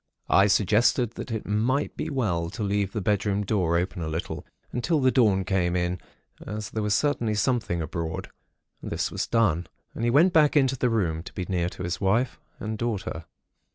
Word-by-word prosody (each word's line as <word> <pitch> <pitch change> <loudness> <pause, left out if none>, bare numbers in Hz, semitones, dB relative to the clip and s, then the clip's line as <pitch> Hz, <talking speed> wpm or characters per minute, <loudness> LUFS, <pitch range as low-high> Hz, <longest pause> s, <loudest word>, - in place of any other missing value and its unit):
I 100 +1 +6
suggested 110 +4 +3
that - - -7
it 110 -2 -3
might 120 +7 0
be - - -3
well 95 - -1
to 105 - -5
leave 100 -1 0
the 105 - -3
bedroom 100 0 +1
door 90 -5 +1
open 90 +1 -2
a 80 - -3
little, 80 +2 -4 0.2
until 150 +7 0
the 130 -1 +4
dawn 105 -7 +3
came 90 -2 0
in, 90 0 0 0.4
as 105 0 -5
there 110 - -2
was 105 0 +1
certainly 120 -7 +1
something 110 -8 0
abroad. 80 +1 -4 0.5
This - - -2
was - - -2
done, 90 -8 +2 0.3
and 115 - -5
he 120 - +3
went 165 +9 +5
back 150 -2 +5
into 135 -2 +3
the 125 -1 +1
room, 85 -8 0
to - - -11
be 90 - -4
near 90 -2 0
his 90 -1 -3
wife 110 +6 +1 0.2
and 110 0 -4
daughter. 100 -8 -3
105 Hz, 190 wpm, -26 LUFS, 90-120 Hz, 0.5 s, I